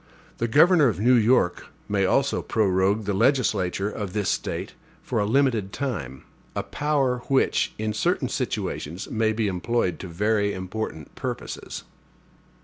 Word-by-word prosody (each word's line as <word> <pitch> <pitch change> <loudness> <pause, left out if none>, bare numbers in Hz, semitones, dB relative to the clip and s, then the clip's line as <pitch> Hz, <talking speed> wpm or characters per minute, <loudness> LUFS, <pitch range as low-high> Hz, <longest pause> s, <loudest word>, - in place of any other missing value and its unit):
The 115 - +1
governor 150 +4 +5
of 100 -7 -1
New 120 +4 +4
York 115 -6 +3 0.2
may 100 -2 +1
also 140 +6 +2
prorogue 100 0 +1
the 100 - 0
legislature 100 -4 +1
of 100 -4 -5
this 105 -3 0
State - - -3 0.3
for 115 - -1
a 100 - +1
limited 115 -5 +2
time; 80 - -4 0.3
a - - -1
power 140 -4 0
which, 135 -1 +1
in 110 0 -2
certain 105 - 0
situations, 85 +6 -3
may 110 -1 +1
be 110 -1 0
employed 95 -1 -1
to 95 - -6
very 100 +3 0
important 95 -4 -5
purposes. - - -6
105 Hz, 140 wpm, -25 LUFS, 95-125 Hz, 0.3 s, governor